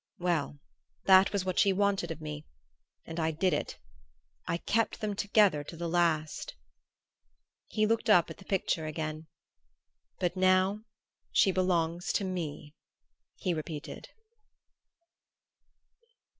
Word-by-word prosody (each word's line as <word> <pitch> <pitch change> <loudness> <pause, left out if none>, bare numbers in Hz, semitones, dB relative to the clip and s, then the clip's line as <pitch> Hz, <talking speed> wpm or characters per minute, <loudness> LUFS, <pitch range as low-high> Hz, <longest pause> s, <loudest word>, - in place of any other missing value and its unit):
Well 170 -5 -1 0.5
that 190 0 +6
was 200 -2 -1
what 185 -1 0
she 200 - +5
wanted 195 -2 +1
of 165 -1 -6
me 150 -1 -6 0.6
and 165 +1 -6
I 160 0 +1
did 165 +3 +1
it 145 - -3 0.7
I 170 - 0
kept 225 +5 0
them 210 -2 -2
together 205 -7 +3
to 165 - -9
the 170 +1 -3
last!" 165 -3 0 1.1
He 215 - +1
looked 225 +1 0
up 175 -6 +6
at - - -9
the 195 - -14
picture 175 -5 -1
again. 155 0 -5 0.9
"But 180 0 0
now 185 +3 +2 0.5
she 195 - +4
belongs 175 -2 0
to - - 0
me," 160 -6 -5 0.6
he 185 -4 -1
repeated.... 155 -2 -6
175 Hz, 125 wpm, -30 LUFS, 160-195 Hz, 1.1 s, that